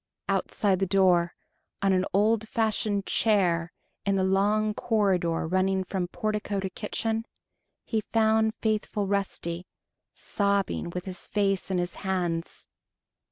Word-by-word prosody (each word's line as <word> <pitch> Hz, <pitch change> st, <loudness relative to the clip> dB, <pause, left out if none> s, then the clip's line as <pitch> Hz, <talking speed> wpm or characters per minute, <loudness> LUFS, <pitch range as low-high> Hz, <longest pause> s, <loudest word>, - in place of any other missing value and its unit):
Outside 195 Hz, -4 st, +1 dB
the 195 Hz, -, +1 dB
door, 180 Hz, -3 st, +3 dB, 0.5 s
on 195 Hz, -1 st, +4 dB
an 185 Hz, 0 st, +2 dB
old 215 Hz, +2 st, +2 dB
fashioned 215 Hz, -3 st, 0 dB
chair 180 Hz, -6 st, +2 dB, 0.3 s
in 200 Hz, 0 st, +1 dB
the 190 Hz, -, +2 dB
long 205 Hz, +3 st, +2 dB
corridor 190 Hz, -8 st, +1 dB
running 185 Hz, +2 st, +1 dB
from 185 Hz, -1 st, -2 dB
portico 210 Hz, +1 st, -2 dB
to 190 Hz, -1 st, -3 dB
kitchen, 225 Hz, +3 st, -2 dB, 0.6 s
he 220 Hz, -2 st, 0 dB
found 220 Hz, 0 st, +3 dB
faithful 215 Hz, -2 st, -1 dB
Rusty, 190 Hz, -3 st, -2 dB, 0.4 s
sobbing 200 Hz, -3 st, 0 dB
with 180 Hz, +1 st, -5 dB
his 185 Hz, -1 st, -4 dB
face 195 Hz, -2 st, 0 dB
in 190 Hz, -, 0 dB
his 175 Hz, 0 st, -1 dB
hands. 175 Hz, -4 st, -2 dB
195 Hz, 125 wpm, -27 LUFS, 185-215 Hz, 0.6 s, on